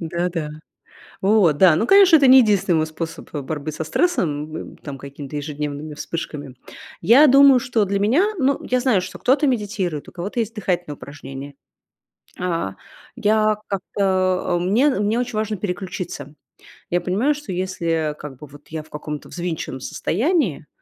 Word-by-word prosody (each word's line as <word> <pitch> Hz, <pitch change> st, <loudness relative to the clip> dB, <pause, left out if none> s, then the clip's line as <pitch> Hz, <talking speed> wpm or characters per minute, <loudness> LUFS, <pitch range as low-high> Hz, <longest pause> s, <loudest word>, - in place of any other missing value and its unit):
Да-да. 170 Hz, -2 st, -2 dB, 0.7 s
Вот, 190 Hz, -7 st, +3 dB
да, 175 Hz, -3 st, +7 dB
ну, 220 Hz, -, +1 dB
конечно, 390 Hz, -3 st, +7 dB
это 280 Hz, -3 st, +5 dB
не 260 Hz, +1 st, +9 dB
единственный 205 Hz, -6 st, +2 dB
мой 155 Hz, 0 st, +1 dB
способ 165 Hz, +1 st, -7 dB
борьбы 150 Hz, +1 st, -4 dB
со 155 Hz, +2 st, -5 dB
стрессом, 155 Hz, -, 0 dB
м, -, -, -8 dB
там, 145 Hz, -2 st, -8 dB
какими-то 140 Hz, +1 st, -9 dB
ежедневными 150 Hz, 0 st, -5 dB
вспышками. 145 Hz, -4 st, -6 dB, 0.5 s
Я 265 Hz, +8 st, +7 dB
думаю, 275 Hz, -1 st, +7 dB
что 230 Hz, -3 st, +1 dB
для 200 Hz, 0 st, -1 dB
меня, 245 Hz, -, +3 dB
ну, 275 Hz, -1 st, +1 dB
я 255 Hz, -, 0 dB
знаю, 245 Hz, -7 st, +2 dB
что 185 Hz, -, -8 dB
кто-то 285 Hz, +4 st, +2 dB
медитирует, 200 Hz, -, -2 dB
у -, -, -11 dB
кого-то 185 Hz, +7 st, -5 dB
есть 225 Hz, 0 st, -3 dB
дыхательные 175 Hz, -7 st, -2 dB
упражнения. 140 Hz, 0 st, -9 dB, 0.9 s
А 165 Hz, -, -2 dB, 0.4 s
я 215 Hz, 0 st, +2 dB
как-то, 185 Hz, -2 st, 0 dB
а, -, -, +1 dB
мне 210 Hz, +11 st, +3 dB
мне 220 Hz, -3 st, 0 dB
очень 245 Hz, -2 st, -3 dB
важно 215 Hz, -1 st, -1 dB
переключиться. 180 Hz, -6 st, -5 dB, 0.6 s
Я 175 Hz, 0 st, +1 dB
понимаю, 215 Hz, +11 st, +1 dB
что 290 Hz, -6 st, -8 dB
если, 185 Hz, -1 st, -3 dB, 0.2 s
а, -, -, -7 dB
как 150 Hz, -3 st, -10 dB
бы 150 Hz, -, -10 dB
вот 145 Hz, +1 st, -16 dB
я 160 Hz, -1 st, -5 dB
в 155 Hz, -, -22 dB
каком-то 150 Hz, 0 st, -6 dB
взвинченном 170 Hz, -6 st, -4 dB
состоянии, 225 Hz, -, -1 dB
180 Hz, 160 wpm, -21 LUFS, 150-220 Hz, 0.9 s, не